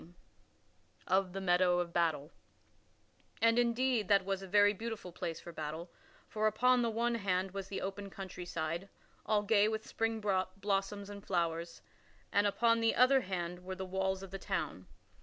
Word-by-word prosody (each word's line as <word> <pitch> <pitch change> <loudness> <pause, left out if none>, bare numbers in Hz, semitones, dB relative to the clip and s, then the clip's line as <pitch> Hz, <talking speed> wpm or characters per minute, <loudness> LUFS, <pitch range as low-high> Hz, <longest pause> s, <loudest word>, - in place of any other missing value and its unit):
[Sidenote: 175 +2 -16 0.9
Of 190 -1 +1
the 195 - -4
meadow 180 -1 +3
of 170 -1 -3
battle] 160 -3 0 1.1
And, 230 +1 +4
indeed, 240 -2 +2
that 195 -1 +4
was 195 -1 -1
a 195 - -8
very 205 +2 +5
beautiful 220 -3 -6
place 165 -1 -4
for 170 - -9
battle, 160 +2 -6 0.4
for 215 -1 0
upon 250 +4 +3
the 235 - +1
one 235 +2 0
hand 190 -4 0
was 195 0 -5
the 195 - -4
open 195 +1 -5
countryside, 175 -2 -5 0.4
all 210 -1 +2
gay 210 0 +4
with 220 0 -2
spring 225 0 -1
blossoms 195 0 -1
and 200 -1 -9
flowers; 170 -2 -2 0.5
and 205 +1 +3
upon 230 +3 +3
the 225 0 +2
other 260 +2 +5
hand 180 -3 -4
were 185 +1 -5
the 190 - -5
walls 190 +1 -1
of 190 - -9
the 195 - -5
town. 170 - -3
195 Hz, 170 wpm, -33 LUFS, 180-215 Hz, 1.1 s, very